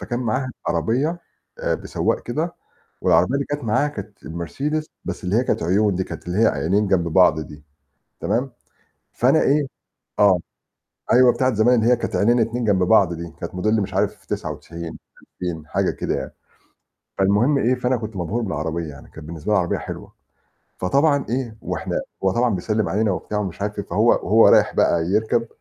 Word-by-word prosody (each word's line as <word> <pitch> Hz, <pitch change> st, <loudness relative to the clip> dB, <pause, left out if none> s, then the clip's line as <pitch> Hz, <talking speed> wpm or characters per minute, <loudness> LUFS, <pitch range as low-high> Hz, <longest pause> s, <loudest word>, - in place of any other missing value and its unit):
فكان 120 Hz, -, -3 dB
معاها 130 Hz, +3 st, -1 dB, 0.2 s
عربية 145 Hz, +9 st, 0 dB, 0.4 s
آآ، -, -, 0 dB
بسواق -, -, -2 dB
كده 155 Hz, +8 st, -3 dB, 0.5 s
والعربية 130 Hz, -, +3 dB
اللي 140 Hz, -, -1 dB
كانت 145 Hz, -1 st, -4 dB
معاها 120 Hz, +6 st, +1 dB
كانت 110 Hz, -8 st, -9 dB
مرسيدس 140 Hz, -, -3 dB, 0.2 s
بس -, -, -5 dB
اللي 90 Hz, +3 st, 0 dB
هي 120 Hz, -, +3 dB
كانت 120 Hz, -, -1 dB
عيون 100 Hz, +3 st, +2 dB
دي، 95 Hz, -, 0 dB
كانت -, -, -9 dB
اللي 90 Hz, +4 st, -1 dB
هي 115 Hz, -, +5 dB
عينين 95 Hz, +8 st, +1 dB
جنب 90 Hz, -3 st, +2 dB
بعض 85 Hz, -2 st, +4 dB
دي 75 Hz, 0 st, -9 dB, 0.6 s
تمام، 130 Hz, +3 st, -1 dB, 0.6 s
فأنا -, -, +3 dB
إيه 145 Hz, 0 st, +2 dB, 0.5 s
آه، 100 Hz, -4 st, +5 dB, 0.7 s
أيوه، 125 Hz, 0 st, +7 dB
بتاعة 130 Hz, -2 st, +1 dB
زمان 110 Hz, +4 st, +4 dB
اللي 115 Hz, +2 st, +3 dB
هي -, -, +5 dB
كانت 120 Hz, -, -4 dB
عينين 120 Hz, +4 st, +3 dB
2 115 Hz, +2 st, 0 dB
جنب 95 Hz, -3 st, +3 dB
بعض 95 Hz, -2 st, +4 dB
دي 85 Hz, -1 st, -7 dB
كانت 85 Hz, -, -6 dB
موديل 110 Hz, +4 st, +1 dB
مش 100 Hz, 0 st, -4 dB
عارف 95 Hz, -, -1 dB
99 85 Hz, -1 st, -6 dB, 0.2 s
2000، 85 Hz, -4 st, -6 dB
حاجة -, -, 0 dB
كده -, -, -2 dB
يعني. -, -, -5 dB, 0.9 s
فالمهم 105 Hz, +9 st, +3 dB
إيه، 125 Hz, 0 st, +2 dB
فأنا 125 Hz, 0 st, 0 dB
كنت 110 Hz, -3 st, -6 dB
مبهور 95 Hz, +7 st, -2 dB
بالعربية 80 Hz, -4 st, -3 dB
يعني، 70 Hz, -, -13 dB
كانت 80 Hz, -1 st, -11 dB
بالنسبة 80 Hz, +5 st, -4 dB
العربية 95 Hz, -4 st, +1 dB
حلوة، -, -, -8 dB, 0.7 s
فطبعا 140 Hz, -, +2 dB
إيه 120 Hz, -3 st, -3 dB
وإحنا -, -, -3 dB, 0.2 s
هو 95 Hz, -, +3 dB
طبعًا 120 Hz, 0 st, +1 dB
بيسلم 105 Hz, +3 st, -1 dB
علينا 105 Hz, 0 st, +1 dB
وبتاع 105 Hz, +3 st, -3 dB
ومش 95 Hz, -2 st, -5 dB
عارف 105 Hz, 0 st, -3 dB
إيه، -, -, -4 dB
فهو -, -, +1 dB
وهو -, -, +5 dB
رايح -, -, +5 dB
بقى 85 Hz, -1 st, +2 dB
يركب 110 Hz, +5 st, +1 dB
105 Hz, 180 wpm, -22 LUFS, 90-125 Hz, 0.9 s, أيوه